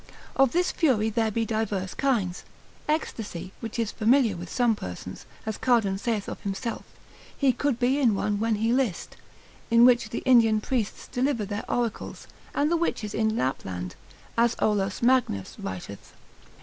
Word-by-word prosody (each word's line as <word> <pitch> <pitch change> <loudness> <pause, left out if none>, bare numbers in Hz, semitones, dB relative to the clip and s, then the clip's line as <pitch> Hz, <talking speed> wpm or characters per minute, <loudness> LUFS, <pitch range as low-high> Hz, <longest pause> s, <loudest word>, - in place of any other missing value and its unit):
Of 270 -2 +4
this 355 +2 +1
fury 225 - +2
there 225 0 +1
be 225 +2 -1
divers 210 -4 -2
kinds; 215 -10 0 0.5
ecstasy, 215 - -2
which 225 -1 -6
is 230 -2 0
familiar 230 -1 +3
with 175 0 -7
some 240 +1 +2
persons, 90 - -8 0.2
as 220 -1 -3
Cardan 220 -6 +2
saith 220 -2 -1
of - - -6
himself, 200 +4 -3 0.5
he 270 -3 +3
could 285 -3 0
be 255 +3 +2
in 235 -7 +3
one 205 +1 -1
when 225 0 +1
he 225 +3 +1
list; 250 -9 -1 0.5
in 235 0 +7
which 240 -3 +4
the 230 - -4
Indian 230 -4 +5
priests 225 -1 -2
deliver 250 -3 0
their 205 +1 -5
oracles, 235 -3 -2 0.3
and 295 +2 +2
the 340 - +3
witches 220 -10 -2
in 220 0 +1
Lapland, 90 -8 -3 0.5
as 235 0 +3
Olaus 195 -1 0
Magnus 240 - +2
writeth, 95 +2 -7
l. - - -27
225 Hz, 160 wpm, -26 LUFS, 200-245 Hz, 0.5 s, in